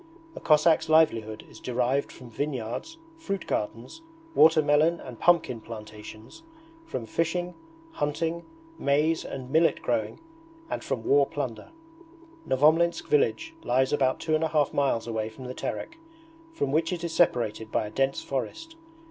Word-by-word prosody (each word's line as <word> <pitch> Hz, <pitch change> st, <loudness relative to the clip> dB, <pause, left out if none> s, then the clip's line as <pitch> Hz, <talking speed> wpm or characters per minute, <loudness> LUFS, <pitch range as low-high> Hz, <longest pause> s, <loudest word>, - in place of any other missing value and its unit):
A -, -, -6 dB
Cossack's 155 Hz, +1 st, +4 dB
livelihood 115 Hz, -9 st, +2 dB
is -, -, -14 dB
derived 125 Hz, +3 st, 0 dB
from 125 Hz, -2 st, -13 dB
vineyards, 140 Hz, -, -4 dB, 0.2 s
fruit 200 Hz, -, -4 dB
gardens, 115 Hz, -, -4 dB, 0.3 s
water 160 Hz, -, +6 dB
melon 155 Hz, +3 st, +3 dB
and 125 Hz, -3 st, -10 dB
pumpkin 160 Hz, -9 st, +3 dB
plantations, 110 Hz, -, -10 dB, 0.5 s
from 120 Hz, -, -4 dB
fishing, 175 Hz, +6 st, -1 dB, 0.4 s
hunting, 160 Hz, -, -2 dB, 0.4 s
maize 150 Hz, +3 st, +2 dB
and 130 Hz, -1 st, -7 dB
millet 160 Hz, +2 st, +3 dB
growing, 285 Hz, -, -1 dB, 0.5 s
and -, -, -3 dB
from 130 Hz, -4 st, -3 dB
war 140 Hz, +2 st, +4 dB
plunder. 125 Hz, -7 st, -5 dB, 0.8 s
Novomlinsk 160 Hz, +5 st, +3 dB
village 115 Hz, -7 st, +1 dB
lies 130 Hz, +3 st, +1 dB
about 130 Hz, -3 st, +2 dB
two 160 Hz, -, -2 dB
and 155 Hz, +1 st, +2 dB
a -, -, +2 dB
half 150 Hz, -3 st, +1 dB
miles 135 Hz, -5 st, +1 dB
away 110 Hz, -2 st, -2 dB
from 120 Hz, +4 st, -11 dB
the 125 Hz, -, -5 dB
Terek, 335 Hz, -, -5 dB, 0.5 s
from 140 Hz, -, -2 dB
which 165 Hz, +3 st, +1 dB
it 175 Hz, -1 st, -4 dB
is 170 Hz, -1 st, -3 dB
separated 115 Hz, -9 st, +1 dB
by -, -, 0 dB
a 105 Hz, -, -7 dB
dense 135 Hz, +2 st, 0 dB
forest. 325 Hz, -, -4 dB
140 Hz, 150 wpm, -27 LUFS, 120-165 Hz, 0.8 s, water